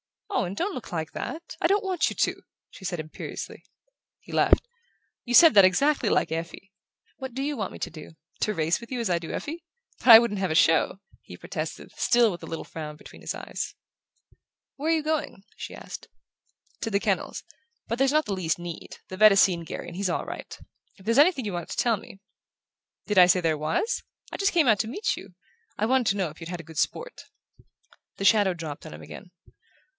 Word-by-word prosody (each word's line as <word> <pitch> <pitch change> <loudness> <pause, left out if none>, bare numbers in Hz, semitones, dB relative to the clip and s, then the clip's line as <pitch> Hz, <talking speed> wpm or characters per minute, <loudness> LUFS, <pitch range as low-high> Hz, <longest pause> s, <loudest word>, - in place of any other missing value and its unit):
"Owen, 195 - -1
don't 380 - -2
look 250 - -8
like 160 -2 -3
that! 335 +1 -6
I - - +4
don't 400 +3 +2
want 370 -4 +1
you - - -7
to!" - - 0 0.3
she 190 - -12
said 175 -2 -2
imperiously. 155 0 -7 0.6
He - - -14
laughed. - - +3 0.6
"You 245 0 +1
said 330 -1 +9
that 200 -3 +8
exactly 280 +11 +2
like - - +1
Effie. 165 +4 -5 0.5
What 265 -3 -7
do 270 - -2
you 295 +1 -1
want 205 -7 -4
me - - -8
to - - -3
do? 155 -1 -11 0.3
To 215 - 0
race 165 +1 +1
with 235 - -12
you 255 - -2
as 230 -4 -1
I 170 - +2
do 165 - -7
Effie? 320 +2 -5 0.4
But - - -9
I 230 -2 +13
shouldn't 225 -3 +1
have 190 -1 0
a 155 - -1
show!" 165 +4 +3 0.2
he - - -12
protested, - - -6
still 240 -2 +4
with 175 - -7
the - - -8
little 165 - -5
frown 155 -2 -7
between - - -14
his - - -4
eyes. - - -5 1.0
"Where 305 +4 0
are - - +4
you 315 - -1
going?" 310 -10 -2
she - - -7
asked. - - -9 0.7
"To 225 - -3
the 200 -2 +1
kennels. - - -2 0.4
But 230 - -3
there's 270 +1 +3
not 310 0 +3
the 205 - -2
least 175 -4 -1
need. 175 -1 -8
The 185 - -7
vet 215 +1 +8
has 195 - +6
seen 180 -3 +3
Garry - - -6
and 170 - -8
he's 195 0 -1
all - - -1
right. - - -8 0.4
If 190 - -18
there's 230 +4 +3
anything 295 -5 +4
you 205 - -3
wanted 175 -2 -5
to - - -6
tell 230 -3 +2
me 195 - -13 0.4
" - - -63
"Did 210 -3 +3
I 180 - +9
say 180 0 +4
there 160 -2 +1
was? 160 - -1 0.3
I - - -5
just 395 0 +1
came 330 -6 +4
out 215 -4 +4
to 220 - 0
meet 400 - -1
you 190 -2 -12 0.4
I 210 - +1
wanted 255 0 +2
to 200 - +2
know 185 -4 0
if 150 - -14
you'd 165 -1 -8
had 175 -3 -6
good 160 -1 -6
sport." - - -3 0.9
The 195 - -4
shadow 200 -2 +4
dropped 155 -4 -7
on - - -9
him 75 +1 -10
again. 180 - -11
200 Hz, 225 wpm, -26 LUFS, 175-265 Hz, 1.0 s, I